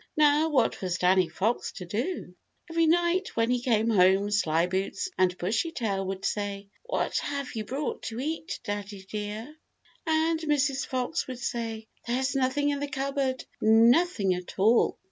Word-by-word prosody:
Now 300 +1 +4
what 265 -6 +1
was 185 -1 -1
Danny 185 -1 +3
Fox 205 +9 -1
to 185 - -7
do? 215 - -3 0.4
Every 330 0 +3
night 345 +3 +2
when 230 +1 +2
he 250 -1 +1
came 230 -3 +2
home 195 +1 +4
Slyboots 185 - 0
and 185 -1 +2
Bushytail 205 - -1
would 190 0 -4
say, 200 -1 -3 0.2
"What - - 0
have 280 -2 -4
you 220 -2 -3
brought 275 +6 -3
to 225 +1 -6
eat, 315 +4 -3
daddy 205 -1 -5
dear?" 215 +7 -5 0.5
And 320 +1 +2
Mrs. 285 -3 0
Fox 255 +5 -2
would 255 -2 -5
say: 225 -2 -4 0.2
"There 240 +2 0
is 265 +1 0
nothing 270 +2 +1
in 285 - -2
the 285 - -2
cupboard; 275 -2 -2 0.2
nothing 225 - +4
at 180 0 -7
all!" 220 +5 +4
235 Hz, 160 wpm, -27 LUFS, 200-285 Hz, 0.5 s, Now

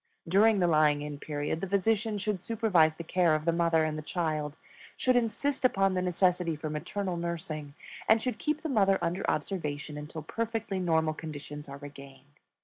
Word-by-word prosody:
During 205 +5 +5
the 180 - +3
lying 155 -3 +3
in 145 -1 -6
period 150 +2 -3
the 195 - -2
physician 210 +2 +1
should 205 -2 -2
supervise 190 -9 +3
the 170 - -7
care 170 -1 +3
of 155 0 -3
the 170 - +4
mother 165 -1 +2
and 155 0 -2
the - - -5
child, 155 -2 -2 0.4
should 255 -1 +2
insist 245 +4 0
upon 195 -6 +3
the 185 - 0
necessity 180 -2 +1
for 155 0 -5
maternal 180 +4 -3
nursing, 160 -4 -4 0.3
and 220 - +6
should 250 +2 -3
keep 305 +1 -1
the - - -1
mother 195 -8 +3
under 175 +3 -1
observation 150 -3 -3
until 150 +1 -7
perfectly 225 +1 -3
normal 160 -3 +2
conditions 150 -2 -8
are 140 - -7
regained. 140 0 -13
170 Hz, 180 wpm, -29 LUFS, 150-200 Hz, 0.4 s, and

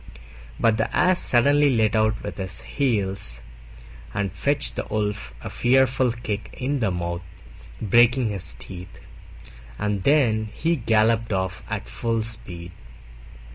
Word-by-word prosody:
But 115 -2 +3
the 110 - -1
Ass 185 +1 +4
suddenly 145 +4 +4
let 110 -4 +2
out 110 0 +1
with 105 - -6
his 95 -2 -5
heels 95 - -1 0.7
and 100 -2 -1
fetched 145 +1 0
the - - -3
Wolf 105 - -2
a - - -5
fearful 130 0 +3
kick 110 -3 -5
in 140 +2 -1
the 110 -5 +1
mouth, 85 -1 -3 0.6
breaking 120 +3 +4
his 90 -11 0
teeth; 90 +8 -9 0.8
and 105 -2 -1
then 110 -5 +3
he 165 +1 +1
galloped 115 -2 +2
off 95 -2 -2
at - - -4
full 115 -1 -1
speed. 90 -6 -5
110 Hz, 135 wpm, -24 LUFS, 95-125 Hz, 0.8 s, Ass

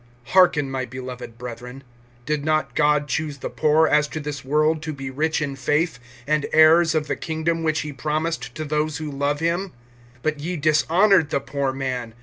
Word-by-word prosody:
(5)Hearken, 175 -6 +4
my 135 -1 -3
beloved 125 -2 -8
brethren. 125 +2 -8 0.4
Did 150 -1 -1
not 155 0 0
God 150 -1 +2
choose 150 +1 -2
the - - -6
poor 155 +1 +3
as 150 0 +3
to 155 - -5
this 145 -1 -5
world[2:5] 155 +3 +1
to 155 -1 -4
be 135 -2 -6
rich 155 +3 0
in 140 -2 -4
faith, 150 +2 0 0.3
and 150 0 0
heirs 160 +1 +6
of 155 -1 +1
the - - -2
kingdom 165 +1 -2
which 160 0 0
he 150 -1 -6
promised 155 +4 -3
to 155 - -4
those 150 0 -1
who 155 -2 -5
love 145 +2 -1
him? 170 +3 -1 0.5
(6)But 155 -2 -1
ye 175 +4 -3
dishonored 160 +4 +3
the 140 - 0
poor 140 0 -2
man. 130 -4 -4
150 Hz, 185 wpm, -23 LUFS, 140-160 Hz, 0.5 s, heirs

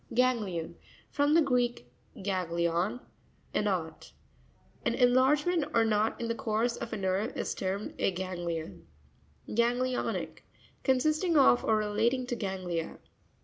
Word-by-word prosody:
Ga'netion.—From 240 - 0
the 330 - +6
Greek, 245 - 0 0.4
gag 185 -3 -1
glion, 170 +7 0 0.5
a - - +2
knot. - - -3 0.7
An - - 0
enlargement 285 +6 +3
or 230 -1 +5
knot 215 0 +1
in 235 - -2
the 230 - 0
course 230 +1 0
of 235 - -6
a 220 - -3
nerve 190 +2 -1
is - - -2
termed 195 +2 -3
a - - +3
ganglion. 175 - -5 0.6
Ga'netionic.—Consisting 255 - 0
of, 265 -3 +5
or 220 - +3
re 215 - 0
lating 235 +5 0
to 245 - -1
ganglia. 185 -6 -3
225 Hz, 125 wpm, -30 LUFS, 185-255 Hz, 0.7 s, the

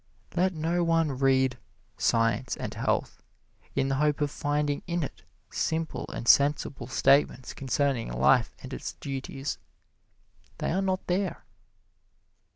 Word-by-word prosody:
Let 185 +1 +2
no 165 +3 0
one 165 -2 +2
read 130 -2 +3 0.4
"Science 115 +1 +1
and - - -4
Health" - - -1 0.5
in 135 - +2
the 135 0 0
hope 150 -1 +2
of 145 -1 0
finding 145 -1 -1
in 170 -1 -1
it - - -6 0.3
simple 160 0 -2
and 120 - -6
sensible 140 -3 +3
statements 130 -1 +3
concerning 135 - 0
life 70 - +3
and 130 +1 -7
its - - -5
duties. 135 0 -5 1.0
They - - -1
are 190 +4 +1
not 190 -1 -1
there. 185 +2 -1
140 Hz, 130 wpm, -28 LUFS, 130-165 Hz, 1.0 s, read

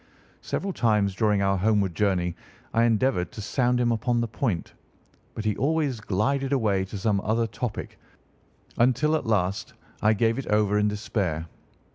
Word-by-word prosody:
Several 195 -1 -3
times 105 - +2
during 105 +1 +2
our 95 0 +2
homeward 100 -2 +2
journey 90 -1 +1 0.4
I 115 +1 +4
endeavoured 115 -6 +1
to 110 - -7
sound 125 +2 +1
him 120 -1 +2
upon 120 +2 0
the 120 - 0
point, 110 -5 -2 0.6
but 110 - -5
he 105 -2 +1
always 145 -1 0
glided 130 +8 0
away 105 -7 +1
to 95 - -7
some 100 0 +1
other 115 +3 +1
topic, 115 +1 -5 0.8
until 130 +6 +3
at 145 - -2
last 100 -2 0 0.3
I 105 +1 +4
gave 115 +3 +1
it 135 - -6
over 105 -1 +2
in 105 - +2
despair. 100 -6 -2
110 Hz, 160 wpm, -26 LUFS, 100-120 Hz, 0.8 s, I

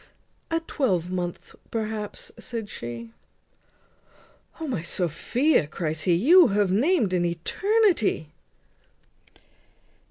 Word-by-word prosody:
"A 330 0 +1
twelvemonth, 180 - -2 0.2
perhaps," 215 -2 -4
said 230 -4 -5
she. 115 -1 -7 1.5
"O! 320 - -4
my 240 - -2
Sophia," 175 - +1
cries 155 -1 -3
he, 175 - +4
"you 325 - +7
have 200 -1 +1
named 235 - +2
an 180 -1 +2
eternity." 220 - +1
200 Hz, 90 wpm, -25 LUFS, 170-275 Hz, 1.5 s, you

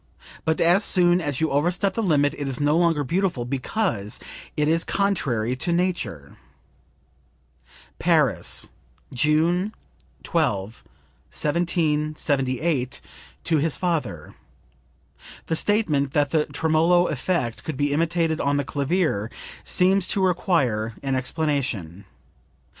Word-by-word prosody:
But 160 0 +1
as 175 +5 +4
soon 175 -2 +3
as 145 -5 -2
you 160 - +1
overstep 175 +7 +1
the 230 - -1
limit 145 -7 +2
it 145 -3 -4
is 135 -2 -3
no 145 +1 +2
longer 165 -3 +2
beautiful 170 -4 -1
because 125 - -2 0.4
it 150 0 +2
is 165 +1 +2
contrary 135 - 0
to 170 +6 -1
nature." 170 - -2 1.6
(Paris, 145 - +1 0.4
June 165 - +1 0.5
12, 110 - -1 0.5
1778, 150 -4 0 0.4
to 160 - +1
his 155 +1 0
father. 150 - -2 1.1
[The 165 - -1
statement 155 -9 +1
that 145 -1 +1
the 155 -2 +1
tremolo 160 +4 +3
effect 135 -5 -2
could 155 -4 -5
be 145 0 +1
imitated 165 0 0
on 145 0 +1
the 145 - 0
clavier 140 - 0 0.3
seems 185 +1 +2
to 195 -2 +1
require 130 - 0
an 135 -1 0
explanation. 130 - -2
155 Hz, 115 wpm, -24 LUFS, 135-175 Hz, 1.6 s, as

